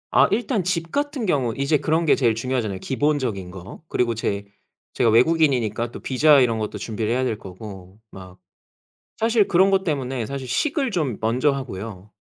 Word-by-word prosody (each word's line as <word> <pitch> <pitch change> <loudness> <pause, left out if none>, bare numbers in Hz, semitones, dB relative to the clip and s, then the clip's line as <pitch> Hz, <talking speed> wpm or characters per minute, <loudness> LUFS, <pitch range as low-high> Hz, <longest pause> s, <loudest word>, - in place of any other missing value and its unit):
아 - - +6
일단 225 -1 0
집 170 -2 -1
같은 285 -4 -2
경우 135 - +1
이제 140 +3 +2
그런 160 +4 0
게 155 - +5
제일 120 -4 +2
중요하잖아요 115 -5 -2
기본적인 130 -8 -1
거. 95 - -10
그리고 120 -5 0
제 100 -2 -3 0.5
제가 120 - +2
외국인이니까 120 -3 +2
또 - - -9
비자 140 +2 +4
이런 115 -3 +1
것도 105 -1 -4
준비를 110 +1 -3
해야 130 +2 +1
될 120 -4 -1
거고, 95 -1 -11
막. 90 -1 -12 0.8
사실 225 -2 +2
그런 190 +2 +4
것 195 0 +2
때문에 135 -6 -2
사실 135 0 -6
식을 275 - 0
좀 155 - -1
먼저 125 +6 +2
하고요. 105 -7 -7
125 Hz, 355 characters per minute, -23 LUFS, 110-160 Hz, 0.8 s, 아